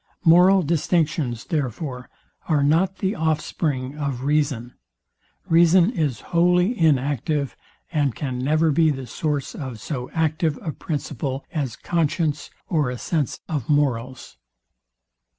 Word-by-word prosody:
Moral 180 Hz, +3 st, +6 dB
distinctions, 155 Hz, -6 st, 0 dB
therefore, 130 Hz, -, -3 dB, 0.4 s
are 150 Hz, -3 st, +3 dB
not 170 Hz, +6 st, +2 dB
the 195 Hz, +1 st, -1 dB
offspring 150 Hz, -, -1 dB
of 140 Hz, -4 st, -3 dB
reason. 140 Hz, -5 st, 0 dB, 0.7 s
Reason 170 Hz, +4 st, +5 dB
is 150 Hz, -, -1 dB
wholly 180 Hz, +6 st, +3 dB
inactive, 145 Hz, -, +1 dB, 0.4 s
and 145 Hz, -7 st, 0 dB
can 130 Hz, -4 st, -3 dB
never 155 Hz, +4 st, +2 dB
be 160 Hz, +2 st, +4 dB
the 135 Hz, -3 st, -3 dB
source 145 Hz, +3 st, -2 dB
of 130 Hz, -6 st, -6 dB
so 125 Hz, 0 st, -5 dB
active 160 Hz, -1 st, 0 dB
a 160 Hz, -, -2 dB
principle 140 Hz, -2 st, -4 dB
as 140 Hz, -7 st, -2 dB
conscience, 160 Hz, -2 st, -1 dB, 0.2 s
or 150 Hz, -6 st, +1 dB
a 125 Hz, -, -4 dB
sense 150 Hz, +1 st, -2 dB
of 145 Hz, -8 st, -3 dB
morals. 130 Hz, -4 st, -1 dB
150 Hz, 120 wpm, -23 LUFS, 135-165 Hz, 0.7 s, Moral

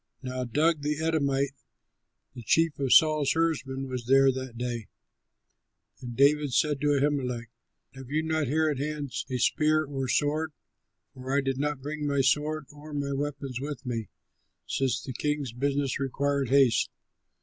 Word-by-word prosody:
Now 130 Hz, 0 st, -3 dB
Doeg, 150 Hz, +6 st, +2 dB
the 150 Hz, +1 st, -1 dB
Edomite, 140 Hz, -4 st, +1 dB, 0.8 s
the 120 Hz, -, -8 dB
chief 160 Hz, +6 st, +2 dB
of 135 Hz, -2 st, 0 dB
Saul's 155 Hz, -3 st, +5 dB
herdsmen, 140 Hz, -5 st, -1 dB
was 125 Hz, -2 st, -5 dB
there 135 Hz, +1 st, +6 dB
that 130 Hz, -2 st, -6 dB
day. 120 Hz, -3 st, -3 dB, 1.1 s
And 120 Hz, -2 st, -7 dB
David 145 Hz, 0 st, +4 dB
said 145 Hz, +2 st, +2 dB
to 145 Hz, -1 st, +3 dB
Ahimelech, 125 Hz, -5 st, -1 dB, 0.4 s
"Have 135 Hz, -2 st, -10 dB
you 155 Hz, +2 st, 0 dB
not 160 Hz, -2 st, 0 dB
here 155 Hz, +4 st, +2 dB
at 145 Hz, -4 st, -1 dB
hand 145 Hz, -1 st, -3 dB, 0.2 s
a 130 Hz, -, -1 dB
spear 155 Hz, +5 st, +2 dB
or 135 Hz, -2 st, -3 dB
sword? 150 Hz, +4 st, 0 dB, 0.6 s
For 130 Hz, +1 st, -7 dB
I -, -, +3 dB
did 135 Hz, -1 st, -2 dB
not 145 Hz, -2 st, -2 dB
bring 150 Hz, 0 st, -3 dB
my 140 Hz, -1 st, +2 dB
sword 150 Hz, +3 st, +1 dB
or 150 Hz, +1 st, -10 dB
my 140 Hz, -1 st, -2 dB
weapons 135 Hz, -2 st, -3 dB
with 145 Hz, -2 st, -5 dB
me, 115 Hz, -4 st, -3 dB, 0.6 s
since 135 Hz, -1 st, 0 dB
the 130 Hz, -, -6 dB
king's 145 Hz, -1 st, -2 dB
business 140 Hz, +2 st, -1 dB
required 140 Hz, 0 st, 0 dB
haste." 135 Hz, -3 st, +4 dB
140 Hz, 160 wpm, -28 LUFS, 130-150 Hz, 1.1 s, there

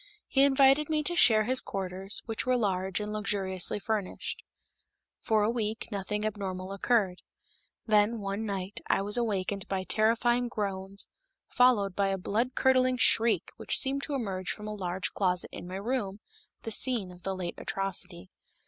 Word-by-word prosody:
He 270 Hz, -, +2 dB
invited 275 Hz, +2 st, +5 dB
me 305 Hz, -1 st, +1 dB
to 345 Hz, +4 st, -1 dB
share 220 Hz, -9 st, +6 dB
his 255 Hz, +4 st, +3 dB
quarters, 190 Hz, +1 st, -3 dB
which 225 Hz, -2 st, -3 dB
were 255 Hz, -1 st, +2 dB
large 190 Hz, -4 st, 0 dB
and 210 Hz, 0 st, -4 dB
luxuriously 195 Hz, -3 st, -1 dB
furnished. 205 Hz, -2 st, -3 dB, 0.8 s
For 220 Hz, -2 st, +2 dB
a 210 Hz, -, +2 dB
week, 220 Hz, -2 st, -3 dB
nothing 210 Hz, +1 st, -3 dB
abnormal 195 Hz, -3 st, -4 dB
occurred. 195 Hz, -3 st, +1 dB, 0.6 s
Then, 215 Hz, +1 st, +3 dB
one 200 Hz, +1 st, -3 dB
night, 195 Hz, -2 st, -4 dB
I 195 Hz, -, +2 dB
was 205 Hz, +1 st, 0 dB
awakened 200 Hz, -4 st, -1 dB
by 190 Hz, -1 st, -2 dB
terrifying 235 Hz, +4 st, +2 dB
groans 195 Hz, -3 st, -3 dB, 0.4 s
followed 215 Hz, -7 st, +3 dB
by 200 Hz, -1 st, +2 dB
a 195 Hz, 0 st, 0 dB
blood 230 Hz, +7 st, -1 dB
curdling 255 Hz, -1 st, +3 dB
shriek 230 Hz, -1 st, +4 dB
which -, -, -1 dB
seemed 275 Hz, +1 st, +1 dB
to 290 Hz, -, -3 dB
emerge 190 Hz, -7 st, -3 dB
from 210 Hz, 0 st, -4 dB
a 215 Hz, -, -4 dB
large 185 Hz, -2 st, -3 dB
closet 180 Hz, -2 st, 0 dB
in -, -, -7 dB
my 185 Hz, -, -6 dB
room, 205 Hz, -1 st, -2 dB, 0.4 s
the 225 Hz, -, -5 dB
scene 220 Hz, -4 st, +2 dB
of 180 Hz, 0 st, -14 dB
the 195 Hz, +1 st, -3 dB
late 180 Hz, -2 st, -4 dB
atrocity. 190 Hz, -2 st, -3 dB
210 Hz, 165 wpm, -29 LUFS, 190-235 Hz, 0.8 s, share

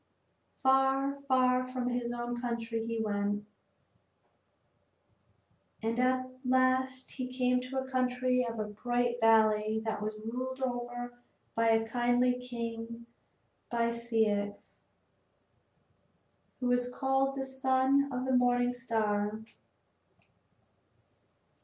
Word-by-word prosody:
Far, 270 Hz, +1 st, +3 dB
far 255 Hz, -1 st, +3 dB
from 255 Hz, -1 st, -2 dB
his 245 Hz, -1 st, -2 dB
own 240 Hz, 0 st, -4 dB
country 230 Hz, -2 st, -2 dB
he 230 Hz, 0 st, -3 dB
went, 205 Hz, -1 st, -1 dB, 2.4 s
and 230 Hz, +2 st, -1 dB
at 255 Hz, 0 st, +2 dB, 0.2 s
last 255 Hz, 0 st, +1 dB
he 255 Hz, -1 st, -5 dB
came 250 Hz, 0 st, +1 dB
to 255 Hz, +1 st, -5 dB
a 265 Hz, 0 st, -2 dB
country 255 Hz, -1 st, +1 dB
of 215 Hz, -2 st, -5 dB
bright 240 Hz, +2 st, 0 dB
valleys 220 Hz, -1 st, +4 dB
that 220 Hz, -2 st, -2 dB
was 215 Hz, 0 st, -3 dB
ruled 255 Hz, +3 st, -4 dB
over 245 Hz, -1 st, -4 dB, 0.3 s
by 230 Hz, 0 st, +2 dB
a 225 Hz, 0 st, +3 dB
kindly 245 Hz, +1 st, +2 dB
king 235 Hz, -1 st, -6 dB, 0.6 s
by 235 Hz, -1 st, +1 dB
Ceyx, 220 Hz, -3 st, -1 dB, 1.8 s
who 250 Hz, -, -3 dB
was 245 Hz, 0 st, +2 dB
called 270 Hz, +1 st, +1 dB
the 270 Hz, -1 st, -3 dB
Son 265 Hz, +1 st, +2 dB
of 250 Hz, 0 st, -2 dB
the 260 Hz, -, 0 dB
Morning 245 Hz, 0 st, +3 dB
Star. 215 Hz, -3 st, -1 dB
245 Hz, 105 wpm, -31 LUFS, 230-255 Hz, 2.4 s, valleys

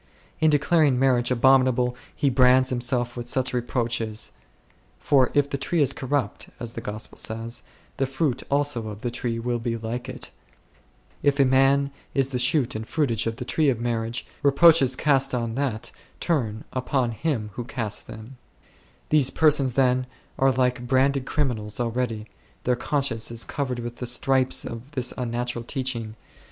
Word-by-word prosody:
In 155 Hz, -, +4 dB
declaring 150 Hz, -2 st, +3 dB
marriage 125 Hz, -2 st, +3 dB
abominable 125 Hz, -1 st, +3 dB, 0.2 s
he 140 Hz, -, +1 dB
brands 130 Hz, 0 st, +5 dB
himself 120 Hz, -1 st, -1 dB
with 120 Hz, -1 st, -6 dB
such 130 Hz, +1 st, 0 dB
reproaches; 115 Hz, -3 st, -1 dB, 0.7 s
for 135 Hz, -3 st, +3 dB
"if 145 Hz, -1 st, +4 dB
the 140 Hz, -, -2 dB
tree 165 Hz, +5 st, 0 dB
is 140 Hz, -2 st, +3 dB
corrupt 140 Hz, 0 st, -2 dB
" -, -, -31 dB
(as 120 Hz, -2 st, -5 dB
the -, -, -6 dB
Gospel 105 Hz, +1 st, -7 dB
says), 115 Hz, +1 st, -4 dB, 0.2 s
" -, -, -32 dB
the 135 Hz, -, 0 dB
fruit 135 Hz, -1 st, -1 dB
also 140 Hz, -5 st, +1 dB
of 105 Hz, 0 st, -7 dB
the 120 Hz, -, -1 dB
tree 120 Hz, -1 st, -3 dB
will 120 Hz, +1 st, -2 dB
be 115 Hz, 0 st, -2 dB
like 115 Hz, +2 st, -5 dB
it -, -, -7 dB, 0.9 s
3"; 145 Hz, -, +4 dB
if 140 Hz, 0 st, -2 dB
a 140 Hz, -, +6 dB
man 135 Hz, +2 st, +3 dB, 0.2 s
is 135 Hz, -1 st, +2 dB
the 125 Hz, -2 st, -2 dB
shoot 130 Hz, 0 st, +2 dB
and 110 Hz, +1 st, -5 dB
fruitage 120 Hz, -9 st, 0 dB
of 115 Hz, -, -2 dB
the 125 Hz, 0 st, -6 dB
tree 150 Hz, +3 st, +2 dB
of 120 Hz, -4 st, 0 dB
marriage, 115 Hz, 0 st, -2 dB, 0.2 s
re 145 Hz, -, +4 dB
proaches 140 Hz, -3 st, +5 dB
cast 135 Hz, -3 st, +2 dB
on 115 Hz, -2 st, -2 dB
that 125 Hz, -4 st, -2 dB, 0.3 s
turn 115 Hz, -10 st, -1 dB
upon 130 Hz, -1 st, 0 dB
him 115 Hz, -4 st, -2 dB
who 120 Hz, -, -5 dB
casts 115 Hz, -4 st, -2 dB
theml 110 Hz, +3 st, -9 dB, 0.8 s
These 145 Hz, -4 st, +4 dB
persons, 145 Hz, -5 st, +3 dB
then, 130 Hz, -1 st, +2 dB, 0.3 s
are 135 Hz, 0 st, +4 dB
like 125 Hz, -1 st, 0 dB
branded 135 Hz, +1 st, +2 dB
criminals 115 Hz, -8 st, -2 dB
already; 115 Hz, -2 st, -2 dB, 0.4 s
their 125 Hz, -, +2 dB
conscience 130 Hz, -3 st, -1 dB
is 115 Hz, -3 st, -3 dB
covered 130 Hz, -1 st, -3 dB
with 120 Hz, 0 st, -6 dB
the 125 Hz, -, -4 dB
stripes 130 Hz, +1 st, +1 dB
of 120 Hz, +5 st, -8 dB
this 125 Hz, -3 st, -1 dB
unnatural 120 Hz, -1 st, -3 dB
teach 130 Hz, +1 st, -2 dB
ing. 110 Hz, -2 st, -6 dB
125 Hz, 175 wpm, -25 LUFS, 115-135 Hz, 0.9 s, a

